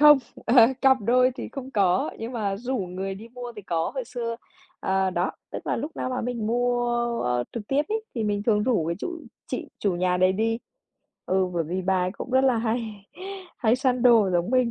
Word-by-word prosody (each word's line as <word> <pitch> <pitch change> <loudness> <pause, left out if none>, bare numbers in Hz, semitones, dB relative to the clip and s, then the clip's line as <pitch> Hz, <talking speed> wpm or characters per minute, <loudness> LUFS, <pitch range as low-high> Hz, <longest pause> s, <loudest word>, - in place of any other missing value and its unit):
không. 295 -1 +9 0.3
Ờ, 235 - +3 0.3
cặp 265 -1 +6
đôi 250 +4 +4
thì - - -6
không 265 -1 -6
có, 190 -5 +2
nhưng 230 +3 -5
mà 200 -4 -1
rủ 255 +4 -2
người 190 0 -3
đi 220 +4 -10
mua 245 0 -8
thì 210 - -7
có. 165 -3 -1
Hồi 260 -3 -3
xưa, 235 -1 -4 0.4
à, 190 0 +1
đó, 180 +1 0 0.2
tức - - -7
là - - 0
lúc 315 +2 -5
nào - - -2
mà 255 - -1
mình 235 -3 -2
mua, 245 +1 +1 0.4
a, 125 - +1
a, - - -2
trực 230 - -4
tiếp 280 +2 +2
ấy 440 0 -1
thì 225 -3 -1
mình 205 -1 0
thường 210 -2 +2
rủ 220 -10 +1
cái 170 +1 -1
chủ 340 - -5 0.3
chị 255 - -4
chủ 190 -4 0
nhà 180 0 +1
đấy 185 +1 +4
đi. 225 +3 0 0.7
Ừ, 190 0 +2
bởi 165 - 0
vì 180 +4 -3
bà 185 0 +2
ấy 180 - -1
cũng 245 - -7
rất 260 +1 +4
là 255 -3 +3
hay 220 -3 -3 0.5
hay 235 0 +3
săn 255 -2 +1
đồ 230 -6 +6
giống 175 +3 +1
mình. 255 -2 +3
225 Hz, 230 wpm, -25 LUFS, 190-250 Hz, 0.7 s, không